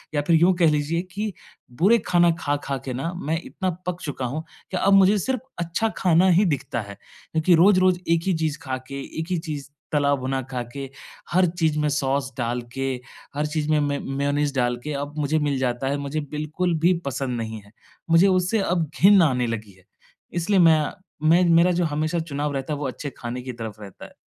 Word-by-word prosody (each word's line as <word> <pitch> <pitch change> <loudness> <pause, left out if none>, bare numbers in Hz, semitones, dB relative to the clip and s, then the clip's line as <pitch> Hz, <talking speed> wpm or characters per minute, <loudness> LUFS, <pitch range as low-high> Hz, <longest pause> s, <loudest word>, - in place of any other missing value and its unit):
या 145 - +2
फ़िर 170 - +5
यूँ 180 +2 +5
कह 170 -3 +5
लीजिए 150 +3 0
कि 210 +2 -3 0.5
बुरे 215 +6 +6
खाना 175 -1 +4
खा-खा 145 -1 -2
के 130 - -3
ना 135 +7 -3
मैं 160 -2 -2
इतना 185 - -3 0.2
पक 180 -1 -2
चुका 140 -3 -4
हूँ 145 +6 -3 0.3
कि 185 - -1
अब 195 +2 +3
मुझे 195 +1 +6
सिर्फ़ 255 +4 -1 0.2
अच्छा 170 +6 0
खाना 180 0 +4
ही 185 +4 +4
दिखता 135 -7 -1
है। 100 -1 -9
क्योंकि 160 - 0
रोज-रोज 185 +1 +5
1 165 0 +3
ही 190 - +3
चीज़ 160 -2 -1
खा 130 -2 -3
के, 140 0 -6 0.2
एक 160 - -3
ही 180 - +1
चीज़ 150 -4 -6 0.2
तला-भुना 140 -3 +1
खा 125 -1 -2
के, 140 -1 -6 0.4
हर 180 +1 +4
चीज़ 160 -2 +2
में 150 0 +1
सॉस 140 -2 0
डाल 120 0 -1
के, 135 0 -1 0.4
हर 150 +1 0
चीज़ 150 0 -2
में 155 - +3
मे 145 -1 0
मेयोनीज़ 140 +1 -1
डाल 120 -1 +1
के 150 - -4
अब 145 +1 -4
मुझे 150 +2 +1
मिल 145 -2 0
जाता 125 0 -1
है 140 - 0
मुझे 140 +2 -3
बिल्कुल 155 +4 -1
भी 175 +3 +4
पसंद 130 -2 -2
नहीं 110 -1 -5
है, 100 - -20 0.4
मुझे 165 +4 +6
उससे 185 +3 +2
अब 175 -5 0
घिन 195 0 +7
आने 125 -6 +2
लगी 110 -3 -4
है। 95 - -24 0.5
इसलिए 180 +3 +1
मैं 160 -3 +6 0.5
मैं 175 +3 +5
मेरा 170 +2 +5
जो 175 - +2
हमेशा 155 +2 -1
चुनाव 150 -2 -3
रहता 135 +2 -3
है - - -2
वो 145 - -2
अच्छे 145 +3 -5
खाने 120 +1 -5
की 130 +1 -6
तरफ 115 -3 -6
रहता 100 -3 -11
है। - - -15
150 Hz, 210 wpm, -24 LUFS, 135-175 Hz, 0.5 s, घिन